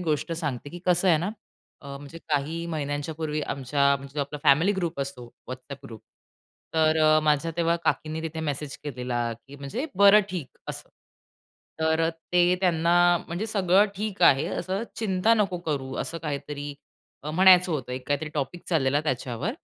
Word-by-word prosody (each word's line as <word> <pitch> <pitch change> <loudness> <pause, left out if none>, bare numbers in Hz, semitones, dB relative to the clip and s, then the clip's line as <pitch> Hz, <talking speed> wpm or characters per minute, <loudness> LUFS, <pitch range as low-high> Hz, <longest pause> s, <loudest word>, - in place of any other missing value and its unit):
गोष्ट 160 -1 -1
सांगते 145 -4 -4
की 175 - -8
कसं 180 +1 +3
आहे 165 - +6
ना 180 +6 -2 0.5
अ, 140 -1 -8
म्हणजे 145 +4 -10
काही 155 +3 -1
महिन्यांच्या 145 -1 -3
पूर्वी 155 -1 -3
आमच्या 140 0 +1
म्हणजे 140 +1 -6
आपला 145 +1 -4
फॅमिली 160 +8 +5
ग्रुप 175 -4 -2
असतो 135 -3 -5 0.3
WhatsApp 135 +2 -8
ग्रुप. 115 -4 -10 0.7
तर 160 0 +3
अ, 155 0 +5
माझ्या 150 +2 +2
तेव्हा 170 0 +2
काकींनी 160 0 -1
तिथे 160 0 -4
मेसेज 145 -2 -3
केलेला, 125 -3 -2
की 135 +5 -13
म्हणजे 140 - -4
"बरं, 200 +2 +8
ठीक 170 -8 -6
असं." - - -6 0.9
तर 160 +1 +2
ते 175 +2 +1
त्यांना 170 -2 +2 0.3
म्हणजे 175 +6 -3
सगळं 200 -2 +3
ठीक 210 0 -3
आहे 135 0 +6
असं. 190 +4 -3
चिंता 215 +1 +2
नको 195 -5 0
करू 135 -3 -2
,असं 165 - -4
काहीतरी 145 -1 -5 0.5
अ, 150 - -4
म्हणायचं 180 +1 +6
होतं 130 -5 -3
एक 125 0 -6
काहीतरी 145 +2 0
टॉपिक 155 +4 -3
चाललेला 145 -4 +2
त्याच्यावर. 130 - -2
155 Hz, 160 wpm, -26 LUFS, 140-175 Hz, 0.9 s, बरं